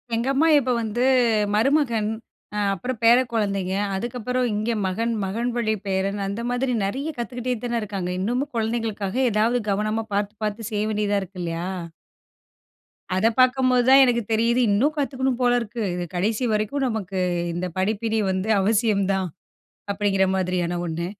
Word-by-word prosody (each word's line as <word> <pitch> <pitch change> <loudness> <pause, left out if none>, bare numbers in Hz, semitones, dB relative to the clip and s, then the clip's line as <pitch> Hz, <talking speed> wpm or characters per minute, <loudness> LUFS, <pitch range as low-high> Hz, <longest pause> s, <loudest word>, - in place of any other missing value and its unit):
எங்க 235 +3 -1
அமமா 290 +4 +3
இப்ப 255 -1 -1
வந்து 225 +3 -1 0.5
மருமகன் 235 -3 +2 0.5
அ - - 0
அப்புறம் 230 +5 -4
பேர 235 +1 +7 0.2
கொழந்தைங்க. 200 -4 -1 0.2
அதுக்கப்புறம் 245 +4 -2
இங்க 215 +3 -1
மகன் 225 +5 -1
மகன் 230 +6 -2
வழி 220 -2 +1
பேரன் 195 +1 -1
அந்த 200 +4 -4
மாதிரி 250 +1 0
நெறைய 270 +11 -2
கத்துக்கிட்டே 245 +1 -3
தான 240 -1 -1
இருக்காங்க. 195 -4 -4
இன்னமும் 245 +8 -1
குழந்தைகளுக்காக 220 -2 -2 0.2
ஏதாவது 225 +4 +2
கவனமா 215 +2 -1
பார்த்து 205 +1 -1
பார்த்து 215 +1 -3
செய்ய 210 0 0
வேண்டியதா 205 -1 +1
இருக்கு 190 0 -9
இல்லையா? 165 +1 -3 1.5
அத 205 +4 +3
பார்க்கும்போது 255 -1 +4
தான் 270 +1 +8
எனக்கு 235 -1 +1
தெரியிது. 230 +3 +2
இன்னும் 275 +10 +2
கத்துக்கணும் 265 -3 -1
போல 245 -1 +4
இருக்கு. 230 +1 -5
இது 180 - -3
கடைசி 215 +7 0
வரைக்கும் 215 +6 0
நமக்கு 195 -5 -3 0.3
இந்த 175 +2 -2
படிப்பினை 220 +3 0
வந்து 190 +3 -2
அவசியம் 210 -1 +2
தான் 190 -1 -1 0.7
அப்படிங்கிற 195 -1 +1
மாதிரியான 180 -1 -1
ஒண்ணு. 170 +1 -3
220 Hz, 145 wpm, -23 LUFS, 195-245 Hz, 1.5 s, தான்